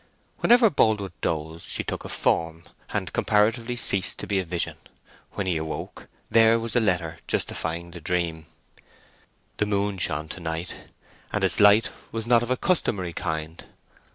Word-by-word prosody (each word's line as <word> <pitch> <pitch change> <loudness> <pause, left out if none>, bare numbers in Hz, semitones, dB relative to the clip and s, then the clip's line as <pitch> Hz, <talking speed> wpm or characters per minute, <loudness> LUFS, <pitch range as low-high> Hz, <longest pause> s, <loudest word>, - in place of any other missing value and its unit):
Whenever 240 -3 +5
Boldwood 105 -7 +1
dozed 80 +1 -3
she - - +3
took - - -5
a - - -7
form, 80 0 0 0.3
and - - -3
comparatively 115 +3 +1
ceased 100 -4 +2
to - - -6
be 100 -2 0
a - - -1
vision: 85 0 -3 0.6
when 100 - -3
he 90 -3 0
awoke 80 0 -6 0.2
there 115 0 +5
was 115 -1 -4
the 120 - +4
letter 90 -6 0
justifying 85 +1 -3
the 85 -1 -10
dream. 80 -2 -2 1.1
The 105 - 0
moon 100 -1 -1
shone 75 -2 +3
to - - -6
night, 80 +1 -4 0.6
and - - -1
its - - +1
light 105 +2 +6 0.2
was 115 -1 -4
not 120 -1 +4
of 120 - -4
a 130 - +1
customary 100 - 0
kind. 80 -2 -4
95 Hz, 160 wpm, -25 LUFS, 80-110 Hz, 1.1 s, light